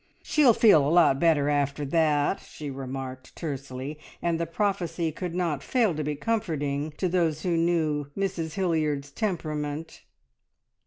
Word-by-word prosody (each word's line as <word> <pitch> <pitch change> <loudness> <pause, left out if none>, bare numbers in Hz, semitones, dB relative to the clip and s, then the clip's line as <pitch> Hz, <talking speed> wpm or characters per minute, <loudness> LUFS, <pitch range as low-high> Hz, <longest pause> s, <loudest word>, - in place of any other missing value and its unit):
"She'll 275 -7 +4
feel 200 -10 +6
a 140 - +1
lot 165 -5 +5
better 155 -4 +3
after 145 0 0
that!" 150 +3 +2
she 150 -2 -8
remarked 130 -1 -7
tersely, 140 -1 -5 0.2
and 170 -1 0
the 170 - -1
prophecy 175 -2 -1
could 175 +2 -5
not 165 -6 -1
fail 225 - +1
to 155 0 -3
be 150 0 -2
comforting 150 -7 -1
to 185 - 0
those 165 -4 0
who 175 -2 +1
knew 160 -4 +1
Mrs 180 -5 -2
Hilliard's 155 -7 0
temperament. 155 -5 -3
155 Hz, 145 wpm, -27 LUFS, 145-175 Hz, 0.2 s, feel